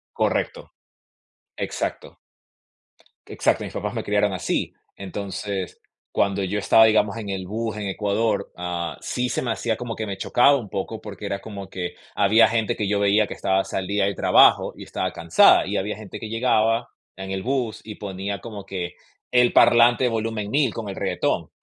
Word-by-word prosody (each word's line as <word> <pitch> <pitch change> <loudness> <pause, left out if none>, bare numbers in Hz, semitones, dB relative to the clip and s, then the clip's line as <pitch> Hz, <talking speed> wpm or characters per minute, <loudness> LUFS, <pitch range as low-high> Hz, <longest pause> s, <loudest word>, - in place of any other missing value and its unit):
Correcto. - - -1 0.9
Exacto. - - -4 1.1
Exacto, - - 0
mis - - -7
papás - - -3
me - - -2
criaron 105 -1 +1
así. 90 - -2 0.2
Entonces, 100 -1 -5 0.3
cuando 100 -1 +1
yo 105 +3 -1
estaba, 110 +3 +6
digamos, 110 0 +2
en 105 -3 -6
el 95 -1 -4
bus 110 +2 -3
en 105 -2 -4
Ecuador, 105 +2 -1
ah, 90 -1 -4
sí 125 0 -2
se - - -1
me 120 - -1
hacía 110 0 -1
como 120 -2 -5
que 110 - -4
me 100 -2 -5
chocaba 125 +8 +4
un 110 -6 -7
poco, 105 +4 -4
porque 105 -1 -8
era 100 -1 -3
como 100 -3 -8
que 90 -1 -5 0.2
había 110 +3 +5
gente 110 -1 0
que 105 - -2
yo 100 0 +1
veía 100 +1 +3
que - - -6
estaba, 95 0 +1
salía 95 +1 -1
del 100 -1 -1
trabajo - - +5
y - - -9
estaba - - -3
cansada, 85 -1 +5
y - - -2
había 105 +1 -2
gente 105 -3 -9
que 110 - -7
llegaba 115 0 +1 0.3
en 95 0 -6
el 95 - -2
bus 125 -2 -2
y 105 - -8
ponía 100 0 -5
como 105 -4 -8
que 90 -2 -5 0.4
el 125 -1 +4
parlante 120 +1 +5
volumen 110 -2 -2
1000 140 -5 +2
con 110 -3 -5
el 95 - -5
reguetón. - - -1
105 Hz, 180 wpm, -23 LUFS, 95-115 Hz, 1.1 s, estaba